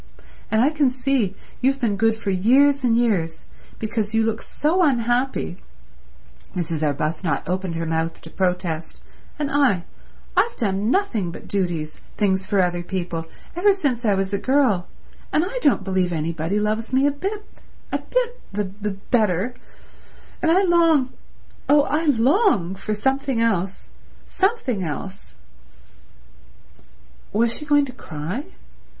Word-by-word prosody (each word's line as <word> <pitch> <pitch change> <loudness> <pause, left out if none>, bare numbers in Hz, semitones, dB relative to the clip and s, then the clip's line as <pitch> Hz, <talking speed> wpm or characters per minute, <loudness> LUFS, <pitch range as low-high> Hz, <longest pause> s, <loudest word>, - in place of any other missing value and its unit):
And 220 +1 +3
I 285 - +3
can 295 -4 +3
see 250 -6 0 0.3
you've 270 +2 +2
been 225 -6 +1
good 225 +2 +2
for 215 -3 -3
years 265 +9 +4
and 235 -2 +3
years, 195 -9 0 0.3
because 220 -1 -2
you 225 - +4
look 225 0 -1
so 330 +5 0
unhappy"— 245 - +1 1.0
Mrs. 165 -3 -2
Arbuthnot 155 +2 -1
opened 185 -1 -2
her 165 0 -2
mouth 160 0 -1
to 160 - -11
protest—"and 180 - -3
I—I've 285 - 0
done 205 -2 0
nothing 245 - +1
but 170 - -9
duties, 170 -6 -2 0.2
things 190 -2 +1
for 200 -1 +3
other 175 -1 0
people, 175 -2 -4 0.3
ever 395 +4 +4
since 270 -10 -1
I 210 -3 +3
was 195 +1 -1
a 200 - +1
girl, 255 -8 +2 0.4
and 310 - +2
I - - -4
don't 275 -8 +3
believe 185 -2 0
anybody 165 +3 -1
loves 215 +2 -1
me 265 +2 +3
a 290 - +4
bit—a 395 +9 -6
bit—the 485 - -2 0.3
b 195 - -14
better—and 240 - -2
I 375 +4 +4
long— 330 -7 +3 0.6
oh, 290 0 +6
I 310 +3 0
long—for 230 - +2
something 265 +2 0
else—something 230 - -2
else—" 175 - -6 2.0
Was 230 +2 +2
she 300 - -7
going 290 -1 +4
to 260 - -8
cry? 180 - -5
225 Hz, 130 wpm, -22 LUFS, 185-280 Hz, 2.0 s, oh